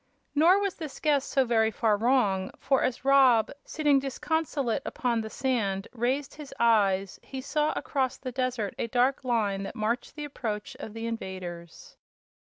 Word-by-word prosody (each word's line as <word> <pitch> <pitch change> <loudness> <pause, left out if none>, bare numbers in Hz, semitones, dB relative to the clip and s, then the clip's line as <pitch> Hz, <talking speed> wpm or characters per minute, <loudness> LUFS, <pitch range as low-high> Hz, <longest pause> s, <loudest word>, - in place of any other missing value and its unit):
Nor 330 +6 +5
was 400 -2 -1
this 310 -5 -8
guess 290 -3 +2
so 270 -2 +1
very 225 -2 +3
far 220 0 +1
wrong; 205 -5 +2
for 270 -1 +1
as 255 +1 -1
Rob, 265 -5 +5
sitting 295 -3 +2
disconsolate 275 -2 -1
upon 235 -2 -1
the 220 - -6
sand, 215 -7 -1
raised 255 +4 -1
his 295 -2 -10
eyes, 200 -5 +2
he 265 - -7
saw 300 +3 0
across 265 -3 -1
the 255 - -6
desert 250 -5 -2
a - - -1
dark 250 +4 +1
line 215 -6 0
that 195 - -6
marked 225 +3 -2
the 300 -1 -5
approach 240 -2 -5
of 220 -6 -8
the 225 0 -4
invaders. 185 -6 -7
245 Hz, 165 wpm, -28 LUFS, 215-275 Hz, -, Nor